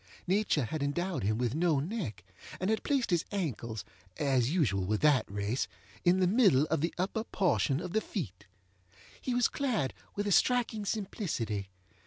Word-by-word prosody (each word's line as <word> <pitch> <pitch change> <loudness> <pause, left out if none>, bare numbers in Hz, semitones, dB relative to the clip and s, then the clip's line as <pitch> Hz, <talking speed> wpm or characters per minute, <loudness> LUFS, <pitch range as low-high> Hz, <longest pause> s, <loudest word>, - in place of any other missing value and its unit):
Nature 185 - +2
had 155 +7 -4
endowed 175 +6 -1
him 105 +2 +1
with 120 -1 0
no 160 -2 +2
neck, 155 - -4 0.4
and 185 +4 0
had 220 - +1
placed 270 -7 0
his 170 -2 +3
ankles 120 - -3 0.3
(as 130 -4 +2
usual 125 - +1
with 105 +3 0
that 150 -3 +4
race) 100 +5 -1 0.4
in 180 +1 +4
the 185 - +4
middle 185 - +5
of - - +2
the 165 - +1
upper 195 +5 -1
portion 175 -10 +1
of 180 +1 -5
the 220 - +2
feet. 110 - -5 0.7
He 250 - -1
was 245 -1 +4
clad 240 - -1 0.2
with 205 - -1
a 205 - 0
striking 230 -1 +2
simplicity. 155 - -2
170 Hz, 170 wpm, -31 LUFS, 125-205 Hz, 0.7 s, middle